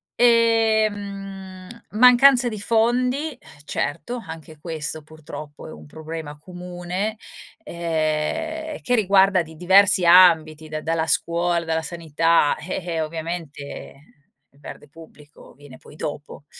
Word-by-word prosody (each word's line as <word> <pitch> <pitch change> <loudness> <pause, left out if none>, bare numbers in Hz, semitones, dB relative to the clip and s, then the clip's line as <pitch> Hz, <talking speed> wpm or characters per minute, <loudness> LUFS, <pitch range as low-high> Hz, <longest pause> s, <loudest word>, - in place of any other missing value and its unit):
ehm, 205 -5 +1 0.2
mancanza 250 +3 +6
di 215 -2 -6
fondi, 250 +7 0
eh, - - -22 0.3
certo. 150 +11 -3
Anche 160 -1 -10
questo 155 -1 -5
purtroppo 155 -1 -11
è - - -10
un 75 -1 -12
problema 155 - -8
comune, 180 +4 -5 0.5
ehm, 170 - -3
che 245 - +1
riguarda 195 -3 +4
di 160 0 -13
diversi 190 +2 +4
ambiti, 160 -3 +5
da 155 0 -5
dalla 165 0 -1
scuola, 170 0 0
dalla 160 0 -1
sanità, 165 -2 +1
eh-eh, 170 +1 -4
ovviamente 160 -2 -6 0.6
il 140 - -26
verde 150 - -11
pubblico 150 -1 -16
viene 145 -2 -15
poi 150 - -17
dopo, 145 -1 -7
170 Hz, 115 wpm, -22 LUFS, 155-205 Hz, 0.6 s, mancanza